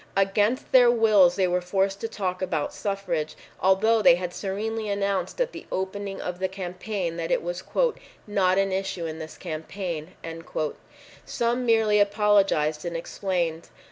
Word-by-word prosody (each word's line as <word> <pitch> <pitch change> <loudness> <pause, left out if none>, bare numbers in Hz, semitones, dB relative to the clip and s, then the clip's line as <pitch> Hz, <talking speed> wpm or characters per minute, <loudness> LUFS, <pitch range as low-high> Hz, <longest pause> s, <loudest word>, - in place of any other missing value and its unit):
Against 205 +5 +1
their 250 -2 +7
wills 215 -7 +5
they 190 -2 +2
were 180 0 +1
forced 195 +2 0
to 225 - -1
talk 185 -4 -3
about 165 -5 -1
suffrage, 195 -6 -2 0.2
although 215 +4 +3
they 170 - +7
had 180 0 -4
serenely 215 +3 -3
announced 200 - -1
at - - +1
the - - -10
opening 195 +1 -3
of 180 0 -5
the 190 - +1
campaign 185 -1 -4
that 165 -1 -3
it - - +1
was 175 +1 -4 0.6
"not 195 -3 +2
an 195 0 +2
issue 190 -2 -2
in 160 0 -5
this 160 -1 -8
campaign." 170 0 -5 1.1
Some 240 +1 -1
merely 220 -2 +4
apologized 200 -7 +3
and 170 -1 -3
explained. 170 -2 -2
195 Hz, 150 wpm, -26 LUFS, 175-205 Hz, 1.1 s, their